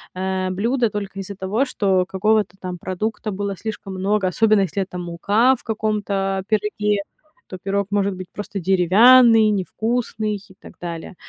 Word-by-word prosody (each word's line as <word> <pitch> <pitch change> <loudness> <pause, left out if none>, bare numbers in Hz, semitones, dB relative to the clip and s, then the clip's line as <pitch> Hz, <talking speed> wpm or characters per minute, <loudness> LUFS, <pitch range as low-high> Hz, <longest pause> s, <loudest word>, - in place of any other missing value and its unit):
э, 185 0 -2
блюда 230 +6 0
только 200 -1 -5
из-за 195 +1 -6
того, 200 +7 0
что 190 -7 +1
какого-то 195 0 +1
там 180 -1 -5
продукта 210 +4 -3
было 200 0 -3
слишком 205 -1 -6
много, 195 +1 0
особенно 215 +3 +3
если 195 +1 -1
это 185 -1 -5
мука 200 +9 +2
в 250 - -17
каком-то, 205 -3 -1
э, - - -13
пироге, 210 -1 0 0.5
то 185 - -8
пирог 195 +2 -2
может 200 -1 +1
быть 185 0 -8
просто 205 -1 -6
деревянный, 215 +6 +6
невкусный 215 +2 -1
и 200 -1 -12
так - - -13
далее. 170 +1 -7
200 Hz, 160 wpm, -21 LUFS, 190-215 Hz, 0.5 s, деревянный